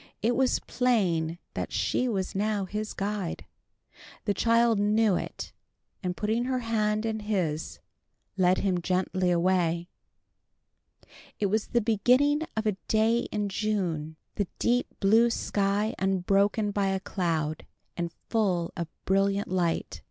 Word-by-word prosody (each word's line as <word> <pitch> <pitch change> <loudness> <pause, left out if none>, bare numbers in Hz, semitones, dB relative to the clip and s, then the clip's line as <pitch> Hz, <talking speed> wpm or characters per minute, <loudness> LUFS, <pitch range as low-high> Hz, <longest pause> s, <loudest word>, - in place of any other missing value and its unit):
It 235 +2 +2
was 265 -1 +3
plain 185 -10 0 0.2
that - - -4
she 255 - 0
was 195 -5 -2
now 205 0 0
his 210 +3 -4
guide. 200 -3 -3 0.8
The 205 - +2
child 230 +1 +3
knew 210 -1 +3
it, - - -5 0.5
and 180 -3 -3
putting 220 +3 0
her 260 0 0
hand 215 -2 0
in 220 -1 -1
his, 185 -8 -2 0.6
led 185 -1 +3
him 185 -3 0
gently 185 +1 0
away. 175 -1 +1 1.5
It 200 -2 +1
was 215 0 0
the 240 - +1
beginning 250 +7 +3 0.2
of 220 - 0
a 210 -3 0
day 225 +2 +2
in 210 -1 -1
June, 185 -7 -2 0.2
the 205 - -1
deep 245 +1 +1
blue 220 +4 +5
sky 205 -1 0
unbroken 195 +2 +2
by 200 -1 0
a 190 0 0
cloud, 165 -5 -2 0.3
and 170 -1 -3 0.2
full 185 -7 0
of 170 -2 -3 0.2
brilliant 195 +1 +1
light. 175 -2 -1
200 Hz, 135 wpm, -28 LUFS, 185-220 Hz, 1.5 s, blue